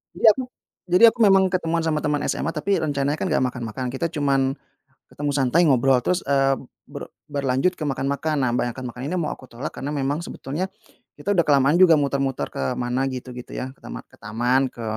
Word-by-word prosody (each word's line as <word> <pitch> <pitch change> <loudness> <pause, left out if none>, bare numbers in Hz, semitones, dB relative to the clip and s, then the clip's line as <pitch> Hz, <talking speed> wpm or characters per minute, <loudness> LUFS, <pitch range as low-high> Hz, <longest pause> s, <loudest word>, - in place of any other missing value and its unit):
Jadi - - -10
aku 260 +5 -3 0.4
jadi 180 +5 +3
aku - - -19
memang 195 -4 +5
ketemuan 170 -2 0
sama 160 -2 0
teman 150 -1 -1
SMA, - - -3
tapi 195 +6 0
rencananya 145 -1 -1
kan - - -1
nggak 155 -6 +1
makan-makan, 125 0 -3
kita 135 +6 -2
cuman 140 -4 0 0.6
ketemu 145 0 -2
santai 140 +5 +3
ngobrol, 130 -1 +4
terus, 180 +6 +1
eee, 135 -1 +3 0.3
ber - - -8 0.2
berlanjut 140 +5 0
ke - - -3
makan-makan, 140 +3 -1
nah 130 -2 +1
kebanyakan 125 +1 -2
makan 125 - -10
ini 175 - -2
mau 160 - -1
aku 130 - -15
tolak, 120 +5 -5
karena 145 - -4
memang 145 +1 -1
sebetulnya 160 +4 -4 0.5
kita 145 - -2
udah 170 - +4
kelamaan 140 +1 +4
juga 180 -3 +7
muter-muter 135 - -1
ke 65 -1 -2
mana 125 +2 -1
gitu 125 0 -7
gitu 125 - -9
ya, 130 +1 -4
ke - - -30
tama - - -7
ke - - -21
taman, 120 +5 +1
ke 120 - -9
140 Hz, 200 wpm, -23 LUFS, 130-160 Hz, 0.6 s, juga